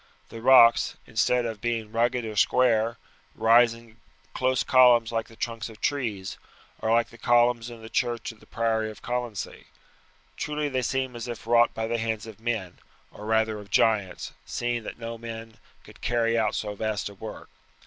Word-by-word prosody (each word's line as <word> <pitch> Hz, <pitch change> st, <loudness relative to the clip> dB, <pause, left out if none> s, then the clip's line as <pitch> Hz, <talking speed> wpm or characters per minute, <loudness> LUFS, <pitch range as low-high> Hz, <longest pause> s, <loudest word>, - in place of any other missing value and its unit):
The 115 Hz, -, -9 dB
rocks, 120 Hz, -2 st, +6 dB
instead 120 Hz, +2 st, +1 dB
of 110 Hz, -3 st, -5 dB
being 115 Hz, -2 st, -2 dB
rugged 120 Hz, +1 st, +1 dB
or 110 Hz, -1 st, -5 dB
square, 115 Hz, 0 st, +3 dB, 0.4 s
rise 115 Hz, +1 st, +5 dB
in 115 Hz, -1 st, -17 dB, 0.4 s
close 130 Hz, 0 st, +1 dB
columns 120 Hz, -3 st, +5 dB
like 115 Hz, -1 st, -2 dB
the 115 Hz, -, -16 dB
trunks 115 Hz, 0 st, -4 dB
of 110 Hz, -1 st, -13 dB
trees, 110 Hz, -10 st, -2 dB, 0.4 s
or 110 Hz, -, -1 dB
like 115 Hz, 0 st, +3 dB
the 115 Hz, -, -16 dB
columns 120 Hz, 0 st, +3 dB
in 115 Hz, -2 st, -11 dB
the -, -, -8 dB
church 120 Hz, +1 st, -1 dB
of 110 Hz, -, -18 dB
the -, -, -20 dB
priory 110 Hz, -1 st, 0 dB
of 110 Hz, -, -12 dB
Colonsay. 120 Hz, -4 st, -4 dB, 0.7 s
Truly 150 Hz, -1 st, -2 dB
they 130 Hz, -2 st, -1 dB
seem 130 Hz, 0 st, -2 dB
as 120 Hz, 0 st, -6 dB
if 120 Hz, -2 st, -7 dB
wrought 120 Hz, 0 st, +4 dB
by 110 Hz, -, -2 dB
the 115 Hz, +1 st, -1 dB
hands 110 Hz, -1 st, -2 dB
of 110 Hz, -1 st, -11 dB
men, 110 Hz, -6 st, -3 dB, 0.3 s
or 105 Hz, -, -10 dB
rather 110 Hz, -1 st, +1 dB
of 100 Hz, -1 st, -12 dB
giants, 105 Hz, -5 st, +1 dB
seeing 120 Hz, -1 st, -2 dB
that -, -, -7 dB
no 115 Hz, 0 st, -6 dB
men 115 Hz, -1 st, -8 dB, 0.3 s
could -, -, -16 dB
carry 115 Hz, -1 st, +1 dB
out 110 Hz, -2 st, +1 dB
so 105 Hz, -1 st, -3 dB
vast 110 Hz, 0 st, -2 dB
a 100 Hz, -, -9 dB
work. 105 Hz, +2 st, -9 dB
115 Hz, 185 wpm, -26 LUFS, 110-120 Hz, 0.7 s, rocks